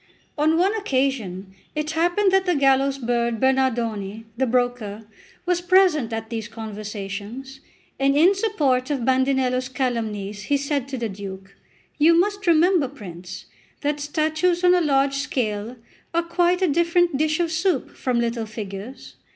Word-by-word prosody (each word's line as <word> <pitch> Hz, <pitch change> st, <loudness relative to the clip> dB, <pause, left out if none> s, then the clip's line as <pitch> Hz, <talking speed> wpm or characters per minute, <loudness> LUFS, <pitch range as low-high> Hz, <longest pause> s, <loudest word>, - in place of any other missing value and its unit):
On 315 Hz, +2 st, +2 dB
one 380 Hz, +4 st, +3 dB
occasion 255 Hz, -, -2 dB, 0.2 s
it 305 Hz, +1 st, -2 dB
happened 350 Hz, +5 st, +2 dB
that 380 Hz, 0 st, +2 dB
the 355 Hz, -, +3 dB
gallows 275 Hz, -1 st, +3 dB
bird 235 Hz, -2 st, -1 dB
Bernardone, 230 Hz, -5 st, 0 dB
the 260 Hz, +2 st, 0 dB
broker, 240 Hz, -3 st, -1 dB, 0.4 s
was 355 Hz, -1 st, +1 dB
present 350 Hz, -9 st, +3 dB
at 225 Hz, +1 st, -5 dB
these 225 Hz, -2 st, -4 dB
conversations, 215 Hz, +4 st, -7 dB, 0.4 s
and 275 Hz, +1 st, +3 dB
in 345 Hz, +6 st, +6 dB
support 300 Hz, -, 0 dB
of 270 Hz, -5 st, -1 dB
Bandinello's 260 Hz, -1 st, +1 dB
calumnies, 215 Hz, -6 st, -3 dB
he 285 Hz, -, +2 dB
said 280 Hz, -1 st, -2 dB
to 270 Hz, -1 st, -5 dB
the 235 Hz, -1 st, -2 dB
Duke: 195 Hz, -1 st, -9 dB, 0.4 s
"You 330 Hz, +3 st, +6 dB
must 405 Hz, +1 st, -1 dB
remember, 340 Hz, -2 st, +4 dB
prince, 180 Hz, -9 st, -9 dB, 0.4 s
that 295 Hz, 0 st, -1 dB
statues 315 Hz, +4 st, 0 dB
on 360 Hz, 0 st, +6 dB
a 360 Hz, -, +3 dB
large 275 Hz, -3 st, +2 dB
scale 230 Hz, -5 st, -2 dB, 0.4 s
are 340 Hz, -, +2 dB
quite 350 Hz, +2 st, +1 dB
a -, -, +4 dB
different 340 Hz, +1 st, +2 dB
dish 310 Hz, +2 st, +1 dB
of 335 Hz, -2 st, 0 dB
soup 350 Hz, +3 st, 0 dB
from 250 Hz, -2 st, -1 dB
little 230 Hz, -1 st, -1 dB
figures. 210 Hz, +3 st, -8 dB
270 Hz, 150 wpm, -23 LUFS, 225-325 Hz, 0.4 s, in